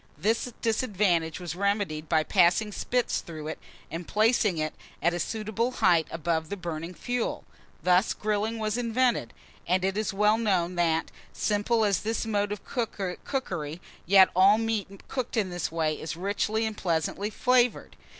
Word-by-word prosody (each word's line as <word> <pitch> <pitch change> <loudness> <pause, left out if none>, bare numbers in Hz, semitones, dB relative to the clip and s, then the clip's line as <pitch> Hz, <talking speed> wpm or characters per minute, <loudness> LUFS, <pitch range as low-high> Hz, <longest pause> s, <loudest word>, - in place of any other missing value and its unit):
This 230 +4 0
disadvantage 200 -8 +1
was 175 -3 -5
remedied 195 -6 -1
by 160 -2 +3
passing 190 +4 +3
spits 245 +4 -1
through 155 -2 -7
it, - - -6 0.3
and 165 +1 -5
placing 215 -4 +2
it 155 0 -1 0.3
at 170 +1 +2
a 175 - -2
suitable 220 +6 -2
height 170 -7 +3
above 160 -1 -2
the 200 - -4
burning 170 -1 -5
fuel. 245 +4 -2 0.4
Thus 180 +3 +3
grilling 215 +2 -1
was 215 +1 -1
invented; 235 - +1 0.4
and 185 +2 +2
it 195 0 0
is 215 +1 -1
well 210 +3 +3
known 185 -6 +1
that, 165 -2 +1 0.2
simple 215 +2 +1
as 200 -3 +2
is - - -6
this 225 +1 -2
mode 205 -2 0
of 210 - -5
cookery, 190 - -3 0.3
yet 190 0 +7
all 195 +3 +6
meat 215 -3 -3
cooked 250 -2 -3
in 195 -4 +1
this 175 -3 -3
way 160 -2 -1
is 160 +1 -4
richly 205 +4 0
and 220 -1 -3
pleasantly 175 +3 -1
flavoured. 250 +1 +1
200 Hz, 160 wpm, -27 LUFS, 170-220 Hz, 0.4 s, yet